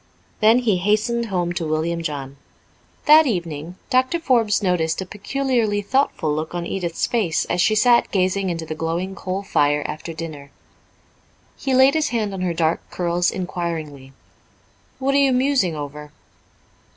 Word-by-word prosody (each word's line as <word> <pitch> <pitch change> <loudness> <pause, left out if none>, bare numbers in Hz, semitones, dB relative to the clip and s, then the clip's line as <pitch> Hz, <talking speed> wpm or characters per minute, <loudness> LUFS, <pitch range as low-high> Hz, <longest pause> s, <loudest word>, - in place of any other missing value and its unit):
Then 220 +2 +5
he 225 -6 +2
hastened 215 +5 0
home 175 -3 -1
to 170 -2 -3
William 160 +2 -1
John. 140 -3 -5 0.7
That 310 0 +7
evening 170 - -3 0.2
Doctor 260 +6 +2
Forbes 235 -10 +2
noticed 165 -4 0
a 190 - -3
peculiarly 220 0 -1
thoughtful 200 - 0
look 155 +3 -4
on 175 -1 -3
Edith's 170 -2 -2
face 205 -10 0
as 175 - 0
she 215 +4 +3
sat 235 +3 +4
gazing 190 0 0
into 165 -2 -3
the 155 - -5
glowing 165 +4 -3
coal 190 0 -4
fire 145 -5 +1
after 155 +2 -5
dinner. 155 -3 -7 1.1
He 265 -1 -1
laid 265 +2 +6
his 315 -1 +1
hand 215 -4 -1
on 190 - -5
her 175 -2 -1
dark 165 0 +1
curls 175 0 0
inquiringly. 165 -7 -5 0.9
"What 275 +1 0
are 280 - +4
you 275 -1 +4
musing 255 - +2
over?" 150 0 -7
185 Hz, 155 wpm, -21 LUFS, 165-230 Hz, 1.1 s, That